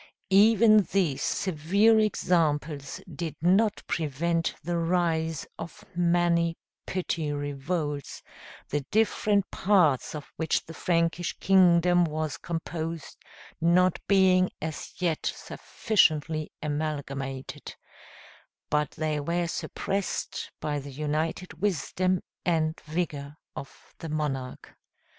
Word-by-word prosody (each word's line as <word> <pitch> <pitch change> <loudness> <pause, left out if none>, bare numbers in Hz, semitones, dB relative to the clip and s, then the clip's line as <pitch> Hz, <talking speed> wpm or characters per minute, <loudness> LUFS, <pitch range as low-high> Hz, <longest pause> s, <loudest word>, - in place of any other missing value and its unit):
Even 215 +1 +7
these 175 -9 +1
severe 200 +6 +2
examples 155 -8 0
did 165 -4 -5
not 195 +6 +2
prevent 165 +2 -1
the 175 +2 -2
rise 165 -2 0
of 165 - -8
many 170 -1 +2 0.3
petty 170 -4 -2
revolts, 145 +1 -3 0.5
the 145 - 0
different 210 -2 +2
parts 175 -10 +2
of 150 - -9
which 160 -2 0
the 165 - -9
Frankish 170 +1 0
kingdom 175 -2 +5
was 155 -2 -2
composed 165 -1 -5 0.5
not 175 +2 +4
being 185 -2 +4
as 155 -1 -5
yet 170 -4 -1
sufficiently 155 - 0
amalgamated; 140 -3 -4 1.0
but 150 -1 +2
they 155 -1 -1
were 170 +4 -1
suppressed 195 +3 -3
by 145 -1 -2
the 140 +1 -8
united 155 +4 -3
wisdom 185 -1 0 0.2
and 160 -2 0
vigor 150 -3 -3 0.2
of 140 - -10
the 165 - -6
monarch. 140 -4 -4
165 Hz, 100 wpm, -27 LUFS, 150-180 Hz, 1.0 s, Even